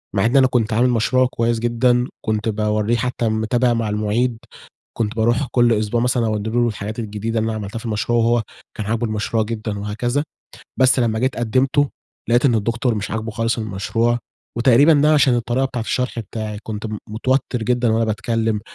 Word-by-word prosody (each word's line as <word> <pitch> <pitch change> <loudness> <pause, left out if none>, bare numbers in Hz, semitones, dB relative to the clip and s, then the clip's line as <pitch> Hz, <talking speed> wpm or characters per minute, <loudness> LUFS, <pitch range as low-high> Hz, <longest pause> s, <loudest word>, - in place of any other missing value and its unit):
مع 95 - +2
إن 120 +4 +3
أنا 130 - +6
كنت 120 -3 0
عامل 125 +3 +3
مشروع 125 +2 +2
كويس 115 0 0
جدًا، 120 +1 +2 0.2
كنت 110 +1 0
باورّيه 105 +1 0
حتى 120 -2 -1
متابع 120 +3 +1
مع 115 -2 -1
المعيد، 110 +3 0 0.6
كنت 115 +1 -1
باروح 120 +5 +1
كل 120 -1 +3
أسبوع 110 +1 0
مثلًا 120 -1 +1
أودّي 110 0 -2
له 120 +1 +2
الحاجات 105 +1 -5
الجديدة 110 +1 -3
اللي 110 - -1
أنا 110 - -3
عملتها 105 +2 -5
في 115 - -11
المشروع، 110 +2 0
وهو 115 0 +2 0.3
كان 105 - -4
عاجبه 115 +2 -1
المشروع 110 +1 -1
جدًا 110 -2 -4
وهكذا، 120 +8 -2 0.5
بس 130 0 +4
لمّا 110 -2 +1
جيت 130 +2 0
قدمته، 130 +5 +1 0.4
لقيت 120 +2 +3
إن 125 -4 +4
الدكتور 115 +3 0
مش 105 -1 -4
عاجبه 110 0 -3
خالص 115 +2 -1
المشروع، 115 +3 -1 0.4
وتقريبًا 130 +6 +5
ده 150 +1 +4
عشان 140 -4 +4
الطريقة 120 +2 0
بتاعة 125 -3 -3
الشرح 125 +1 -2
بتاعي، 110 -1 -5
كنت 110 0 -5
م 105 -1 -5
متوتر 125 +2 -1
جدًا 120 0 +1
وأنا 115 +1 +2
باتكلم، 110 0 -1
115 Hz, 185 wpm, -20 LUFS, 110-120 Hz, 0.6 s, أنا